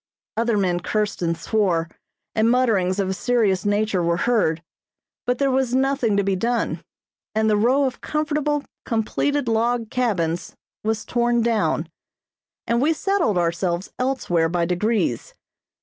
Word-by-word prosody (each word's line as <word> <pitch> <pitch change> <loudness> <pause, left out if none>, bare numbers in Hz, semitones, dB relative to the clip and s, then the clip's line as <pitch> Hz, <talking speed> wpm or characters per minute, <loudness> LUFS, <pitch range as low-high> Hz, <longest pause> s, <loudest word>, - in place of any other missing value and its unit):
Other 230 -1 +1
men 180 -3 +1
cursed 210 +3 -2
and 170 -1 0
swore, 175 -3 0 0.5
and 220 +1 +3
mutterings 220 -7 +2
of 200 -2 0
a - - 0
serious 205 -4 +1
nature 205 -2 +1
were 170 0 +1
heard; 170 -7 +1 0.6
but 245 0 +1
there 275 0 +1
was 260 -1 +1
nothing 265 -5 +1
to 200 - +2
be 195 0 +1
done, 235 +5 -1 0.5
and 220 0 +2
the 215 - +3
row 250 +7 +3
of 255 -2 -4
comfortable, 300 -1 -1 0.2
completed 250 +4 -1
log 230 0 0
cabins 175 -9 -1 0.3
was 220 0 -1
torn 240 -1 +1
down, 230 -2 +1 0.8
and 235 +1 +1
we 310 +4 +3
settled 360 - +1
ourselves 175 +1 -1
elsewhere 215 -11 +1
by 170 0 0
degrees. 180 - -1
220 Hz, 145 wpm, -22 LUFS, 185-245 Hz, 0.8 s, and